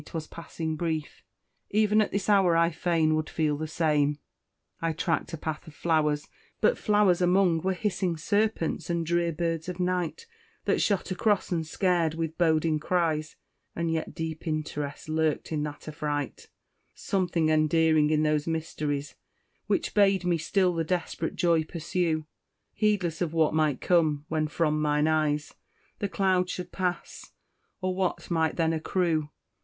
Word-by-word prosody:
'twas 160 Hz, -2 st, -6 dB
passing 160 Hz, -1 st, -5 dB
brief, 160 Hz, -2 st, -3 dB, 0.5 s
Even 215 Hz, 0 st, +3 dB
at 215 Hz, -, 0 dB
this 200 Hz, -1 st, -2 dB
hour 190 Hz, -5 st, +4 dB
I 170 Hz, 0 st, +3 dB
fain 160 Hz, -1 st, +1 dB
would 155 Hz, 0 st, -1 dB
feel 155 Hz, -2 st, 0 dB
the 155 Hz, +2 st, -4 dB
same! 150 Hz, -2 st, +1 dB, 0.6 s
I 165 Hz, -1 st, 0 dB
track'd 165 Hz, +1 st, -1 dB
a -, -, -9 dB
path 155 Hz, +2 st, -5 dB
of 155 Hz, -, -12 dB
flowers 150 Hz, -3 st, +1 dB, 0.3 s
but -, -, +3 dB
flowers 205 Hz, -4 st, +3 dB
among 180 Hz, -2 st, +3 dB
Were 190 Hz, +2 st, 0 dB
hissing 185 Hz, -3 st, -1 dB
serpents 205 Hz, 0 st, 0 dB
and 170 Hz, -1 st, 0 dB
drear 170 Hz, +1 st, +1 dB
birds 165 Hz, +1 st, -2 dB
of 180 Hz, 0 st, -6 dB
night, 180 Hz, -, -1 dB, 0.4 s
That -, -, +2 dB
shot 200 Hz, -2 st, 0 dB
across 205 Hz, +2 st, +1 dB
and 165 Hz, -3 st, -1 dB
scared 170 Hz, -3 st, +1 dB
with 165 Hz, -1 st, -3 dB
boding 160 Hz, -2 st, +2 dB
cries; 155 Hz, -2 st, 0 dB, 0.4 s
And 170 Hz, -1 st, -1 dB
yet 160 Hz, -1 st, -3 dB
deep 160 Hz, +1 st, -5 dB
interest 150 Hz, -2 st, -3 dB
lurked 155 Hz, 0 st, 0 dB
in 155 Hz, -2 st, -1 dB
that 150 Hz, 0 st, -8 dB
affright, 150 Hz, -2 st, -4 dB, 0.5 s
Something 175 Hz, -4 st, 0 dB
endearing 155 Hz, 0 st, +3 dB
in 155 Hz, 0 st, +2 dB
those 150 Hz, 0 st, +1 dB
mysteries, 150 Hz, -3 st, -2 dB, 0.5 s
Which -, -, 0 dB
bade 195 Hz, -3 st, +3 dB
me 175 Hz, -2 st, +1 dB
still 180 Hz, +3 st, +2 dB
the 165 Hz, -1 st, 0 dB
desperate 165 Hz, -1 st, -2 dB
joy 170 Hz, -2 st, +3 dB
pursue, 160 Hz, -1 st, -2 dB, 0.5 s
Heedless 195 Hz, -7 st, 0 dB
of 165 Hz, -3 st, -1 dB
what 160 Hz, -2 st, +2 dB
might 155 Hz, -4 st, +1 dB
come 155 Hz, -5 st, +2 dB
when 155 Hz, -1 st, 0 dB
from 155 Hz, 0 st, 0 dB
mine 150 Hz, 0 st, +2 dB
eyes 155 Hz, -1 st, 0 dB, 0.5 s
The 200 Hz, -, -1 dB
cloud 185 Hz, 0 st, +1 dB
should 180 Hz, -1 st, -5 dB
pass, 180 Hz, -2 st, -4 dB, 0.5 s
or 185 Hz, 0 st, 0 dB
what 185 Hz, -1 st, -2 dB
might 160 Hz, -2 st, +1 dB
then 165 Hz, -1 st, +1 dB
accrue. 160 Hz, -1 st, 0 dB
165 Hz, 155 wpm, -27 LUFS, 155-180 Hz, 0.6 s, hour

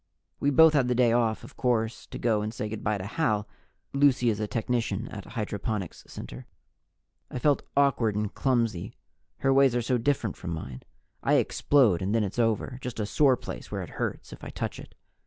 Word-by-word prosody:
We 140 Hz, -, +2 dB
both 160 Hz, +3 st, +7 dB
had 135 Hz, -4 st, +3 dB
the 125 Hz, -, +1 dB
day 120 Hz, -1 st, +4 dB
off, 115 Hz, -2 st, +1 dB
of -, -, -12 dB
course, 115 Hz, -2 st, -1 dB
to -, -, -7 dB
go 110 Hz, -3 st, +1 dB
and 105 Hz, +1 st, -3 dB
say 110 Hz, -1 st, -4 dB
good 110 Hz, 0 st, -6 dB
by 105 Hz, -1 st, +1 dB
to 95 Hz, -, -6 dB
Hal 110 Hz, -3 st, 0 dB, 0.5 s
Lucy 135 Hz, -4 st, +4 dB
is 105 Hz, -, -3 dB
a 105 Hz, -, -1 dB
technician 115 Hz, -2 st, -1 dB
at 100 Hz, -3 st, -8 dB
Hydroponics 105 Hz, -4 st, -4 dB
Center. -, -, -9 dB, 0.8 s
I -, -, -5 dB
felt 145 Hz, +3 st, +2 dB, 0.2 s
awkward 130 Hz, -7 st, +3 dB
and 105 Hz, -1 st, -2 dB
clumsy. 115 Hz, -9 st, 0 dB, 0.5 s
Her 135 Hz, 0 st, +3 dB
ways 135 Hz, -2 st, +5 dB
are 120 Hz, -, +2 dB
so 125 Hz, +1 st, +1 dB
different 115 Hz, -5 st, 0 dB
from 85 Hz, -, -6 dB
mine; 65 Hz, -5 st, -7 dB, 0.4 s
I -, -, +3 dB
explode 120 Hz, -12 st, +3 dB
and 100 Hz, +4 st, 0 dB
then 115 Hz, -, +3 dB
it's 100 Hz, +4 st, -4 dB
over 115 Hz, +2 st, 0 dB
just 125 Hz, -3 st, -5 dB
a 105 Hz, -, 0 dB
sore 130 Hz, +4 st, +3 dB
place -, -, -8 dB
where -, -, -3 dB
it -, -, -10 dB
hurts -, -, -3 dB
if -, -, -13 dB
I -, -, -6 dB
touch -, -, -4 dB
it. -, -, -12 dB
115 Hz, 205 wpm, -27 LUFS, 105-130 Hz, 0.8 s, both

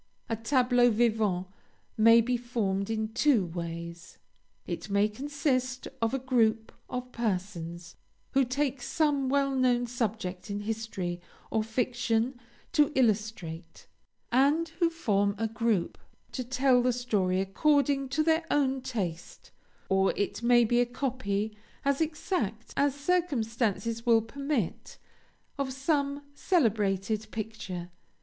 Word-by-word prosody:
"A 225 Hz, -, 0 dB
tableau 245 Hz, +1 st, +3 dB
vivant 215 Hz, -5 st, +1 dB, 0.5 s
may 230 Hz, +1 st, +7 dB
be 250 Hz, +2 st, 0 dB
formed 220 Hz, -5 st, -1 dB
in 220 Hz, -1 st, -1 dB
two 240 Hz, -3 st, +3 dB
ways: 170 Hz, 0 st, -7 dB, 0.5 s
it -, -, -5 dB
may 200 Hz, +1 st, +3 dB
consist 255 Hz, +1 st, -2 dB
of 225 Hz, 0 st, +2 dB
a 270 Hz, -, 0 dB
group 230 Hz, -4 st, +1 dB, 0.2 s
of 250 Hz, 0 st, -5 dB
persons, 180 Hz, -6 st, -4 dB, 0.3 s
who 270 Hz, -, +4 dB
take 265 Hz, +1 st, -1 dB
some 285 Hz, -1 st, +1 dB
well 275 Hz, 0 st, +2 dB
known 250 Hz, -2 st, +2 dB
subject 220 Hz, -6 st, -3 dB
in 205 Hz, 0 st, -3 dB
history 205 Hz, -5 st, -4 dB, 0.3 s
or 220 Hz, -, +2 dB
fiction 240 Hz, +1 st, 0 dB, 0.3 s
to 300 Hz, -2 st, +3 dB
illustrate, 210 Hz, -9 st, -1 dB, 0.5 s
and 285 Hz, +7 st, +3 dB
who 340 Hz, -2 st, +4 dB
form 205 Hz, -11 st, +1 dB
a 225 Hz, +2 st, 0 dB
group 225 Hz, -4 st, -1 dB, 0.3 s
to 255 Hz, -, -3 dB
tell 255 Hz, 0 st, +3 dB
the 250 Hz, 0 st, +2 dB
story 205 Hz, -7 st, 0 dB
according 275 Hz, +7 st, +2 dB
to 295 Hz, +4 st, +1 dB
their 320 Hz, +1 st, +2 dB
own 270 Hz, -2 st, +1 dB
taste; 190 Hz, -10 st, -5 dB, 0.4 s
or, 190 Hz, 0 st, +3 dB
it 205 Hz, -, -2 dB
may 240 Hz, 0 st, +5 dB
be 240 Hz, +2 st, +3 dB
a -, -, +3 dB
copy, 220 Hz, -5 st, -2 dB, 0.3 s
as 280 Hz, +2 st, +2 dB
exact 300 Hz, -, -2 dB
as 280 Hz, -1 st, +2 dB
circumstances 230 Hz, -, 0 dB
will 230 Hz, -2 st, +4 dB
permit, 275 Hz, -, -3 dB, 0.6 s
of 275 Hz, -1 st, -1 dB
some 280 Hz, +1 st, 0 dB
celebrated 215 Hz, -, +1 dB
picture. 195 Hz, -6 st, -6 dB
235 Hz, 125 wpm, -29 LUFS, 205-265 Hz, 0.6 s, may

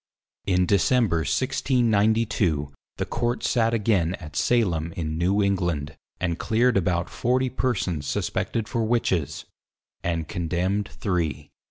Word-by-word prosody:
In 90 Hz, -1 st, +3 dB
December 105 Hz, 0 st, +3 dB
1692, 110 Hz, -, +1 dB, 0.2 s
the -, -, -1 dB
Court 120 Hz, +1 st, -2 dB
sate 115 Hz, -1 st, +2 dB
again 100 Hz, -6 st, +1 dB
at 75 Hz, -7 st, -11 dB
Salem 85 Hz, -9 st, +1 dB
in 80 Hz, -2 st, -3 dB
New 95 Hz, +4 st, +2 dB
England, 85 Hz, -7 st, -1 dB, 0.2 s
and 85 Hz, -2 st, -1 dB
cleared 120 Hz, +2 st, +2 dB
about 90 Hz, -2 st, +1 dB
40 130 Hz, +2 st, 0 dB
persons 95 Hz, -, -1 dB
suspected 110 Hz, +8 st, -2 dB
for 115 Hz, +1 st, -1 dB
Witches, 85 Hz, -, 0 dB, 0.6 s
and 85 Hz, -2 st, -1 dB
Condemned 90 Hz, +5 st, -1 dB
three. 80 Hz, -7 st, -2 dB
95 Hz, 120 wpm, -25 LUFS, 85-115 Hz, 0.6 s, In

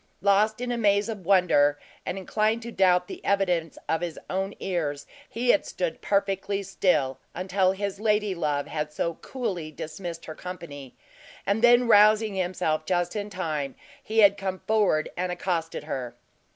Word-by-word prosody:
Lost 205 Hz, +3 st, +3 dB
in 250 Hz, 0 st, -2 dB
a 240 Hz, -, -1 dB
maze 205 Hz, 0 st, +3 dB
of 200 Hz, -6 st, -6 dB
wonder, 160 Hz, -7 st, +4 dB, 0.3 s
and -, -, -2 dB
inclined 215 Hz, +4 st, 0 dB
to 235 Hz, -, -6 dB
doubt 180 Hz, -3 st, +3 dB
the -, -, -9 dB
evidence 180 Hz, -5 st, 0 dB
of 160 Hz, -, 0 dB
his 175 Hz, -2 st, -4 dB
own 195 Hz, +2 st, -2 dB
ears, 145 Hz, -6 st, -2 dB, 0.2 s
he 245 Hz, +2 st, -2 dB
had 205 Hz, -, +2 dB
stood 170 Hz, -3 st, -3 dB
perfectly 200 Hz, 0 st, 0 dB
still, 175 Hz, -9 st, +1 dB, 0.2 s
until 185 Hz, +1 st, +1 dB
his 200 Hz, 0 st, -4 dB
ladylove 190 Hz, -9 st, 0 dB
had 150 Hz, 0 st, -4 dB
so 170 Hz, +2 st, -2 dB
coolly 185 Hz, -12 st, -4 dB
dismissed 165 Hz, +2 st, -7 dB
her 155 Hz, -, -6 dB
company, 155 Hz, -7 st, -9 dB, 0.5 s
and 200 Hz, +3 st, +1 dB
then 240 Hz, 0 st, +6 dB
rousing 215 Hz, 0 st, +5 dB
himself 175 Hz, -4 st, -1 dB
just 175 Hz, +3 st, -1 dB
in 205 Hz, 0 st, -3 dB
time, 155 Hz, -8 st, -3 dB, 0.3 s
he 220 Hz, -, -5 dB
had 200 Hz, 0 st, +6 dB
come 190 Hz, -1 st, -3 dB
forward 205 Hz, -8 st, +2 dB
and 180 Hz, 0 st, -2 dB
accosted 175 Hz, -3 st, -2 dB
her. 125 Hz, -5 st, -5 dB
185 Hz, 160 wpm, -26 LUFS, 165-205 Hz, 0.5 s, then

